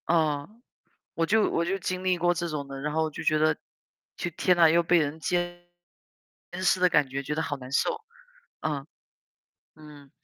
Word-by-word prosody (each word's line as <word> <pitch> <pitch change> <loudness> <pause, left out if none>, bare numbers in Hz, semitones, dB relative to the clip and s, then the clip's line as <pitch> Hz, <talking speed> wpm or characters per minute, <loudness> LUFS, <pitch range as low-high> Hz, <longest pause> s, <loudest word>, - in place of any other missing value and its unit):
哦， 155 -3 +1 0.6
我 165 - 0
就 215 +3 +3
我 170 - 0
就 190 +3 -1
经 185 +1 -3
历 185 -1 +2
过 175 +1 +2
这 170 0 -3
种 145 -3 -4
的， 135 0 -7
然 150 +1 -2
后 160 +1 +2
我 160 - -1
就 - - -7
觉 155 - +3
得， 155 0 +3 0.6
就 175 - -3
天 180 -1 +3
呐， 170 -1 +7
又 170 +2 +4
被 170 +1 +4
人 150 0 -1
监 175 +1 -2 1.0
视 185 0 +3
的 180 - +5
感 150 -5 +3
觉， 135 +1 -3
觉 150 +2 -3
得 160 - -1
好 145 -1 -3
难 130 -1 -10
受。 440 - +1 0.6
嗯。 145 -3 -3 0.9
嗯。 150 -3 -14
160 Hz, 205 characters per minute, -27 LUFS, 150-175 Hz, 1.0 s, 呐